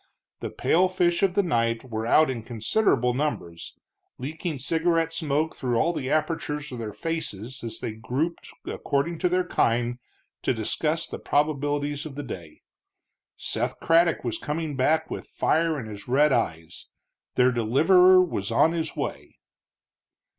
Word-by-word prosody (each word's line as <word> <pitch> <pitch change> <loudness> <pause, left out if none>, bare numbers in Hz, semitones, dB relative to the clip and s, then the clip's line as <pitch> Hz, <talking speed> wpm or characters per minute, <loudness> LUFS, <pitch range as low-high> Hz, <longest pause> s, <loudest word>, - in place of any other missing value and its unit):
The - - -4
pale 185 +3 +2
fish 175 -2 +1
of 190 -2 +2
the 200 - +3
night 115 -8 0
were 110 -2 -4
out 155 +3 +5
in 120 -3 -4
considerable 125 - +1
numbers, 105 - -4 0.4
leaking 155 +4 -4
cigarette 165 +3 +1
smoke 155 -1 -1
through 125 -3 -1
all 170 +7 +2
the 130 -5 -3
apertures 150 -2 -1
of 125 - -6
their 110 -2 -4
faces 130 - -4
as 115 - -5
they - - -3
grouped 125 +10 -3 0.2
according 160 +4 -2
to 180 - +2
their 180 +1 +2
kind 120 -4 +1 0.4
to - - 0
discuss - - -1
the - - -7
probabilities 145 0 0
of 140 - -10
the 145 - -5
day. 85 - -9 0.7
Seth - - -2
Craddock 165 0 +3
was 120 -3 -2
coming 150 0 -3
back 155 +5 +1
with - - -5
fire 160 -1 +1
in 120 - -6
his 105 -2 -9
red 145 +4 +4
eyes; 80 -8 -2 0.5
their 125 0 +4
deliverer 180 - +5
was 100 - -3
on 135 +8 +4
his 160 -2 -3
way. - - -5
145 Hz, 155 wpm, -26 LUFS, 120-165 Hz, 0.7 s, out